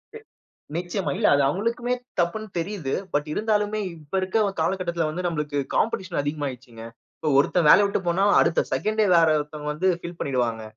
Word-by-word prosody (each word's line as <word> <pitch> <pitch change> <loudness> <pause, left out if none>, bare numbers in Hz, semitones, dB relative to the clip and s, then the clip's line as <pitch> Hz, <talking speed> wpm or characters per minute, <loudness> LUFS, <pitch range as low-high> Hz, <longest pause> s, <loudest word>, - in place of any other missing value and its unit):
எ - - -7 0.6
நிச்சயமா. 180 +3 -2
இல்ல, 210 - +3
அது 140 - +3
அவுங்களுக்குமே 230 - -1 0.3
தப்புன்னு 215 +6 -1
தெரியுது. 170 -6 -3 0.2
பட் 145 +1 0
இருந்தாலுமே, 215 0 0 0.2
இப்ப 150 +1 -13
இருக்கிற 200 +2 +1
காலகட்டத்தில 170 -1 -1
வந்து 175 +3 -3
நம்பளுக்கு 150 -4 -2 0.2
காம்பிடிஷன் 185 -7 0
அதிகமாயிருச்சுங்க. 130 -6 -5 0.4
இப்ப, 155 - -1
ஒருத்தன் 165 +3 +2
வேலைய 205 +7 +7
விட்டு 200 - -1
போனா, 180 +3 +2 0.2
அடுத்த 165 - +2
செகண்ட்டே 215 +11 +1
வேற 165 -1 +5
ஒருத்தவங்க 150 0 -5
வந்து 185 +5 +1
ஃபில் 170 0 -8
பண்ணிடுவாங்க. 120 -4 -1
170 Hz, 155 wpm, -24 LUFS, 150-200 Hz, 0.6 s, வேலைய